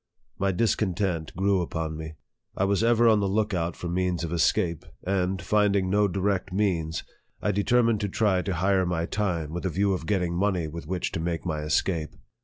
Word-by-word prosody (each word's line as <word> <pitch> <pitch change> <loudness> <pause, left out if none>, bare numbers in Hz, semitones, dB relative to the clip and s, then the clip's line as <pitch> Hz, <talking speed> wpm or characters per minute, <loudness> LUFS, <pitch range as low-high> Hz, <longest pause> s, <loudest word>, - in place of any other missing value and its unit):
My 100 0 +2
discon 95 -1 +1
tent 85 -5 -1
grew 95 +1 +2
upon 80 -2 -3
me. 80 0 -6 0.4
I - - +1
was 100 +1 +2
ever 120 0 +4
on 110 -2 +5
the 100 - +1
look 105 +1 0
out 85 -1 -1
for 90 - -6
means 90 0 -1
of 85 0 -3
escape; 85 0 +1 0.2
and, 95 0 0
finding 100 0 +2
no 105 +1 +4
direct 95 0 -1
means, 90 -5 0 0.4
I 105 - 0
de 100 +1 0
termined 115 -2 +3
to 100 - -2
try 95 -2 +2
to 95 0 -2
hire 95 +1 +2
my 85 -1 -1
time, 85 -6 -2
with 90 - -4
a 95 - 0
view 95 +3 +1
of 85 -3 -4
getting 90 -3 0
money 90 -3 +1
with 80 0 -8
which 90 0 -2
to - - -3
make 85 +1 -2
my 80 -3 -2
escape. 80 +1 0
95 Hz, 205 wpm, -26 LUFS, 85-100 Hz, 0.4 s, on